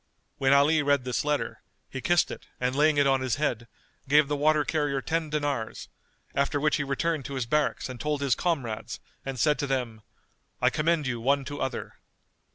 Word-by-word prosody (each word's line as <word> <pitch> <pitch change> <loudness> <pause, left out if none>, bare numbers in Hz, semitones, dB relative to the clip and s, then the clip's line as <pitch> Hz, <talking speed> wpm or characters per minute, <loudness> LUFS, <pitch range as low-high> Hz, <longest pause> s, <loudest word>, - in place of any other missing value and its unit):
When 135 0 +3
Ali 145 +3 +5
read 145 -2 +2
this 125 -5 -1
letter, 150 -1 -2 0.3
he 130 - -6
kissed 175 +4 +2
it - - -9
and 125 +1 0
laying 150 +1 +3
it 145 - +4
on 135 -1 +3
his 130 -4 0
head, 120 -6 -1 0.4
gave 150 0 +5
the 145 - -1
water 150 +1 +3
carrier 145 -3 0
ten 160 +3 -2
dinars; 145 -7 -3 0.4
after 140 +1 +1
which 150 +1 +2
he 145 - -1
returned 140 +1 -1
to 140 - -5
his 130 -3 -1
barracks 150 +5 0
and 130 -2 -8
told 150 -1 -1
his 140 -3 +2
comrades 130 -11 -2 0.2
and 135 -2 -5
said 150 +2 +3
to 145 - -1
them, 125 -5 -2 0.6
"I - - +3
commend 155 0 +1
you 120 -3 -2
one 140 +3 +2
to 145 - -6
other." 130 - -4
140 Hz, 195 wpm, -27 LUFS, 130-150 Hz, 0.6 s, Ali